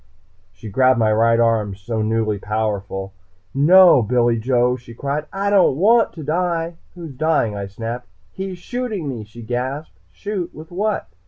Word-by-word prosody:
She 95 +4 -11
grabbed 130 +4 +3
my 110 -2 +3
right 115 +1 +3
arm, 110 -4 +1
so 110 +3 -4
newly 110 -1 0
powerful. 100 -2 -3 0.4
"No, 170 +1 +7
Billy 120 +1 +1
Joe!" 125 +1 +2
she 120 -2 -12
cried. 140 +4 -3
"I 200 +1 -1
don't 185 -9 +4
want 225 +6 +4
to 160 - -8
die!" 165 +1 -1 0.2
"Who's 165 -5 -8
dying?" 145 -7 0
I 100 -1 -4
snapped. 115 +4 -6 0.2
"He's 190 -1 -6
shooting 220 - -4
me!" 120 -5 -4
she 115 +3 -12
gasped. 130 +6 -4
Shoot? 200 -4 -5
With 155 +2 -11
what? 205 +4 -1
125 Hz, 160 wpm, -20 LUFS, 110-170 Hz, 0.4 s, No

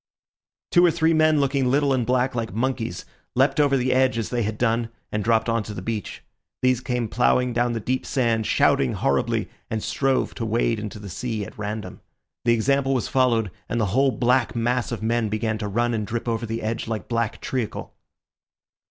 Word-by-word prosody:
Two 175 - +5
or 175 - +7
three 165 0 +2
men, 155 -1 +4
looking 135 -2 +1
little 140 +1 +3
and 125 -3 0
black 130 +1 +1
like 115 -2 -3
monkeys, 115 -5 -2 0.3
leapt 135 +3 +3
over 140 -2 +4
the 130 0 +1
edge 130 -1 +3
as 115 - -2
they 120 -1 -1
had 110 0 -2
done 115 -1 +1 0.2
and 105 -1 -1
dropped 115 0 +2
on 115 -1 +1
to 105 0 -7
the 90 - -5
beach. 110 0 -4 0.4
These 130 -1 +3
came 125 -3 -1
ploughing 125 +2 +2
down 120 0 +1
the 115 - -2
deep 130 +4 -1
sand, 115 -4 +1
shouting 65 - +3
horribly, 70 -1 0 0.2
and 110 -1 -2
strove 135 -1 0
to 115 - -5
wade 115 0 +1
into 105 0 -6
the 105 -1 -9
sea 110 +2 -3
at - - -11
random. 105 +1 -5 0.4
The 120 - +5
example 135 +4 +2
was 125 - -1
followed, 115 -6 +2 0.2
and 120 - -1
the 110 - +2
whole 135 +2 +4
black 125 0 +1
mass 120 +2 0
of 115 -2 -4
men 115 -1 +1
began 110 +1 -1
to 105 - -3
run 120 +4 0
and 105 -2 -2
drip 120 +2 -3
over 115 0 -1
the 115 +1 -4
edge 110 +1 -2
like 110 -1 -4
black 115 -2 -1
treacle. 125 -5 -4
120 Hz, 205 wpm, -24 LUFS, 110-130 Hz, 0.4 s, or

